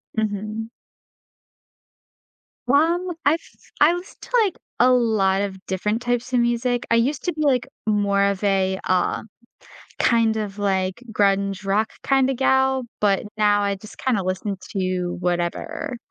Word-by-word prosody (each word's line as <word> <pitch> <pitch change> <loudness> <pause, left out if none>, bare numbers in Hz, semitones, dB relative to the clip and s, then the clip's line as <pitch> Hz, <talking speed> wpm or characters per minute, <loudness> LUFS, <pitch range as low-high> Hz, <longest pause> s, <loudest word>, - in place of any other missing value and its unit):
Mhm. 215 +1 -3 2.0
Well, 335 +7 +2
I've 315 +4 +4 0.4
I 295 +3 +6
listen 355 +2 -7
to, - - -12
like, 390 -4 -2 0.2
a 250 +2 +6
lot 215 -6 +2
of 200 -1 -3
different 210 +4 -1
types 245 +1 -2
of 245 - +4
music. 240 +1 0
I - - +6
used 260 +5 +1
to 355 - -1
be, 310 - -5
like, 260 -5 +2 0.2
more 200 -2 +2
of 200 0 -1
a, 190 -1 +2
uh, 185 -1 +1 0.8
kind 230 -2 +3
of, 210 -2 -4
like, 190 +1 -1
grunge 200 -1 +1
rock 210 +3 +1
kinda 270 -1 +2
gal, 265 0 +2 0.2
but 200 -1 +2
now 205 -1 +3
I 200 -1 0
just 210 +2 -13
kinda 230 -7 0
listen 190 +2 -2 0.2
to 185 -3 -2
whatever. 180 - -2
215 Hz, 140 wpm, -22 LUFS, 195-255 Hz, 2.0 s, I